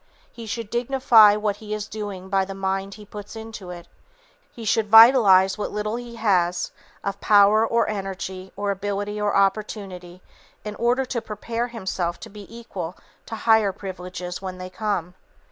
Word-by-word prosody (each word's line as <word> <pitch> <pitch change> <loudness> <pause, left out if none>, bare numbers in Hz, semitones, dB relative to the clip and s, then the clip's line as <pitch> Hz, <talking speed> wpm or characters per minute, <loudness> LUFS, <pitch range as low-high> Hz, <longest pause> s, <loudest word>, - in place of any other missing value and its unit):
He 230 -1 -10
should 225 0 -5
dignify 240 -4 +5
what 210 -1 -1
he 210 0 -5
is 210 0 -5
doing 205 -4 -6
by 195 0 +1
the 195 0 -7
mind 195 0 -3
he 210 - -13
puts 205 +1 -10
into 220 -4 -8
it, 175 -1 -9 0.6
he 230 - -9
should 215 0 +1
vitalize 215 -4 +7
what - - -2
little 210 +1 -3
he 240 -1 -7
has 180 -5 +1 0.3
of 200 0 -4
power 210 +1 +5
or 230 +1 +1
energy 190 -2 -5
or 205 0 -1
ability 205 +1 -3
or 205 -1 0
opportunity, 195 -3 -2 0.4
in 210 - -4
order 245 +3 +1
to 250 -2 -3
prepare 230 +3 -4
himself 190 -7 -3
to - - -9
be 205 -1 -11
equal 195 -7 -7 0.3
to 225 - -5
higher 220 -2 +3
privileges 180 -2 -7
when 185 -1 -6
they 185 0 -8
come. 185 -4 -2
205 Hz, 165 wpm, -23 LUFS, 190-220 Hz, 0.6 s, vitalize